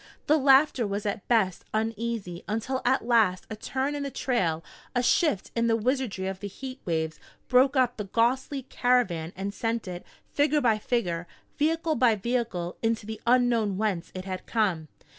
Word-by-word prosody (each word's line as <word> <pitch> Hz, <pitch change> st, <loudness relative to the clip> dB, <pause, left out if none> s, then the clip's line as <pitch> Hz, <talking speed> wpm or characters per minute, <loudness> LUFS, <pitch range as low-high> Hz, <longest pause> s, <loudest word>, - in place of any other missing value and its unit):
The 305 Hz, +1 st, +4 dB
laughter 270 Hz, -3 st, +4 dB
was 200 Hz, +1 st, -3 dB
at 205 Hz, -1 st, -3 dB
best 210 Hz, -7 st, +2 dB
uneasy 220 Hz, -5 st, -2 dB
until 225 Hz, +5 st, -2 dB
at 255 Hz, -1 st, +2 dB
last 220 Hz, -7 st, +3 dB
a -, -, -3 dB
turn 265 Hz, +6 st, -2 dB
in 290 Hz, -, -3 dB
the 280 Hz, -, -2 dB
trail, 215 Hz, -13 st, -1 dB, 0.3 s
a 245 Hz, -, +2 dB
shift 295 Hz, -, +2 dB
in 230 Hz, 0 st, +2 dB
the 225 Hz, -, +3 dB
wizardry 235 Hz, -4 st, -1 dB
of 190 Hz, 0 st, -4 dB
the 205 Hz, -, -5 dB
heat 260 Hz, +6 st, -8 dB
waves, 160 Hz, -2 st, -2 dB, 0.3 s
broke 260 Hz, +2 st, +4 dB
up 250 Hz, -1 st, +2 dB
the 210 Hz, -, -4 dB
ghostly 255 Hz, +6 st, 0 dB
caravan 240 Hz, -11 st, +1 dB
and 195 Hz, +2 st, -4 dB
sent 225 Hz, -1 st, -2 dB
it, 180 Hz, -1 st, -6 dB, 0.2 s
figure 295 Hz, +1 st, +2 dB
by 230 Hz, -6 st, +2 dB
figure, 175 Hz, -8 st, -1 dB, 0.3 s
vehicle 320 Hz, +2 st, +1 dB
by 245 Hz, -6 st, +4 dB
vehicle, 215 Hz, -5 st, -2 dB
into 225 Hz, -2 st, 0 dB
the 220 Hz, 0 st, -7 dB
unknown 235 Hz, -5 st, +3 dB
whence 200 Hz, -5 st, -1 dB
it 185 Hz, 0 st, -5 dB
had 185 Hz, -1 st, -5 dB
come. 185 Hz, -9 st, 0 dB
230 Hz, 175 wpm, -27 LUFS, 195-255 Hz, 0.3 s, The